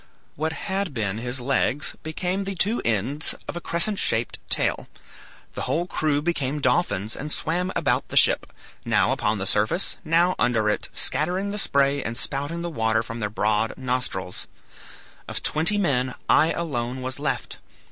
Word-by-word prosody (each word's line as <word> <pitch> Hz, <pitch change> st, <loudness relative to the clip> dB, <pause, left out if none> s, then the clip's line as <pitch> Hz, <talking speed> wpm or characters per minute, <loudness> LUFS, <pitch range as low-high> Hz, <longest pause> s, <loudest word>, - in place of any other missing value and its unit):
What 160 Hz, +2 st, -1 dB
had 190 Hz, -3 st, -3 dB
been 105 Hz, -2 st, -1 dB
his 125 Hz, +2 st, -2 dB
legs 135 Hz, +2 st, 0 dB
became 180 Hz, +5 st, -2 dB
the 195 Hz, 0 st, -4 dB
two 205 Hz, +6 st, +1 dB
ends 115 Hz, +8 st, +2 dB
of -, -, -5 dB
a 175 Hz, -, -4 dB
crescent 185 Hz, +6 st, +3 dB
shaped 115 Hz, 0 st, 0 dB
tail. -, -, +1 dB, 0.7 s
The -, -, -5 dB
whole 170 Hz, +2 st, +1 dB
crew 150 Hz, -4 st, 0 dB
became 150 Hz, -4 st, -1 dB
dolphins 110 Hz, -, +1 dB
and 150 Hz, +2 st, -6 dB
swam 180 Hz, +5 st, -1 dB
about -, -, +1 dB
the -, -, -2 dB
ship, -, -, +5 dB, 0.4 s
now -, -, +2 dB
upon 105 Hz, 0 st, 0 dB
the 95 Hz, -, -3 dB
surface, 105 Hz, -, +3 dB
now 170 Hz, +2 st, +3 dB
under 115 Hz, -3 st, +2 dB
it, -, -, -3 dB
scattering 185 Hz, +6 st, -1 dB
the 210 Hz, -, -4 dB
spray, 140 Hz, -5 st, +2 dB
and 115 Hz, -1 st, -4 dB
spouting 145 Hz, +6 st, -3 dB
the 175 Hz, -, -2 dB
water 110 Hz, -4 st, +1 dB
from 115 Hz, +1 st, -7 dB
their 105 Hz, -2 st, -1 dB
broad 110 Hz, +1 st, 0 dB
nostrils. 125 Hz, -8 st, -3 dB, 0.8 s
Of -, -, -3 dB
twenty 165 Hz, +7 st, +2 dB
men 130 Hz, -9 st, +1 dB
I 160 Hz, +2 st, +5 dB
alone 130 Hz, -6 st, -3 dB
was 130 Hz, 0 st, -3 dB
left. -, -, -3 dB
140 Hz, 165 wpm, -24 LUFS, 115-170 Hz, 0.8 s, ship